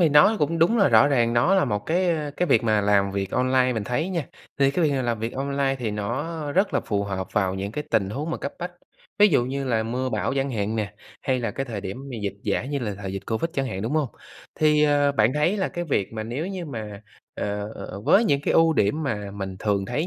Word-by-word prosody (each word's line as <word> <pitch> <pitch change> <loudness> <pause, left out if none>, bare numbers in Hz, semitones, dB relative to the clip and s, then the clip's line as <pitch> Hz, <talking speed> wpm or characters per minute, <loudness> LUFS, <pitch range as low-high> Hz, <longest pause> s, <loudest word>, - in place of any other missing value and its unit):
thì 170 - +5
nó 150 +9 +6
cũng 165 +3 0
đúng 175 +9 +4
là 200 - +5
rõ 115 +2 +6
ràng 120 -4 +2
nó 120 +11 +3
là 190 - +4
một 105 - 0
cái, 180 +3 +1
ơ, 155 -3 -1
cái 180 - +1
việc 115 - +4
mà 110 -2 +2
làm 100 -1 +3
việc 95 -1 -3
online 130 0 +2
mình 110 -4 -2
thấy 125 - -1
nha, 170 -7 -2 0.3
thì 140 0 +4
cái 170 +3 +1
việc 150 - +3
mà 135 - 0
làm 120 -2 -1
việc 115 +2 -3
online 140 0 -1
thì 115 -3 -2
nó 145 +9 -3
rất 195 +5 +2
là - - +3
phù 100 -1 -1
hợp 95 -2 -3
vào 95 -2 +1
những 100 +2 -4
cái 150 +5 -4
tình 100 -3 +1
huống 145 +9 -3
mà - - -1
cấp 140 - -5
bách, 175 +1 -5 0.5
ví 210 0 +7
dụ 130 -8 +3
như 135 +2 -3
là 115 -4 +1
mưa 125 +3 -2
bão 135 - -1
chẳng 135 0 0
hạn 110 -1 -2
nè, 105 -1 -3 0.3
hay 130 -2 0
là 115 -2 -1
cái 135 - -3
thời 110 -5 -5
điểm 95 0 -5
mà 125 - -5
dịch 100 -1 -2
giả - - -1
như 140 +2 -2
là 110 -6 -3
thời 95 -1 -5
dịch 95 - -6
Covid 115 +9 -1
chẳng 135 -1 -1
hạn, 95 -6 -4
đúng 115 +6 -2
hông? 150 -4 +1 0.5
Thì, 150 -1 +4
ờ, 145 -1 +3
bạn 110 -1 +3
thấy 160 +7 +2
là 190 - 0
cái 175 0 -4
việc 115 - -1
mà 110 - -4
nếu 120 +9 -4
như 190 -2 -5
mà, 110 -6 -7 0.3
ờ 105 +1 -3 0.3
với 220 - +5
những 140 -10 +2
cái - - 0
ưu 165 0 +5
điểm 150 +4 +1
mà 105 -8 -3
mình 95 -2 -6
thường 100 -2 0
thấy 155 - -1
130 Hz, 265 wpm, -24 LUFS, 105-150 Hz, 0.5 s, ví